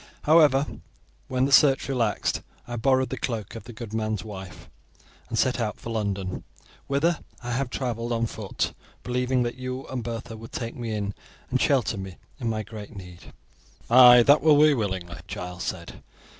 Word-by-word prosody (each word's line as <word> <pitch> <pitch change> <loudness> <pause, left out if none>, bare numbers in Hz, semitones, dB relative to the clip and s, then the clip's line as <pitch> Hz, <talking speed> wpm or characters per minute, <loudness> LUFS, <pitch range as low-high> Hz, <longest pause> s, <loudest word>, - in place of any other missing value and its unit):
However, 150 -3 +5 0.6
when 130 0 +1
the 140 - -1
search 135 +1 +5
relaxed 120 -6 0 0.3
I 120 - -4
borrowed 130 +2 +2
the 130 - -4
cloak 110 -6 -3
of 115 - -9
the - - -9
good 115 -1 -8
man's 110 -3 -1
wife 95 -3 -9 0.6
and 115 - -3
set 130 +2 +2
out 110 -3 -2
for 115 - -7
London, 100 -4 -2 0.4
whither 155 +5 +1 0.2
I 120 - -4
have 130 +1 -1
traveled 120 -2 -3
on 115 0 +1
foot, 110 -3 -3 0.3
believing 125 0 0
that 120 +1 -4
you 130 +1 -5
and 130 -3 -4
Bertha 115 -1 -6
would 115 +1 -11
take 115 -2 -4
me 120 -3 -4
in 105 -1 -2 0.4
and 130 - +1
shelter 130 -6 +2
me 95 -2 -7 0.2
in 120 -3 -1
my 110 -1 -2
great 105 +1 -10
need." 90 -3 -11 0.6
"Aye, 125 -1 +9
that 145 +4 +6
will 155 -2 +6
we 150 0 +6
willingly," 95 -7 -3
Giles 90 -1 -6
said. 85 -2 -6
115 Hz, 175 wpm, -26 LUFS, 105-130 Hz, 0.6 s, Aye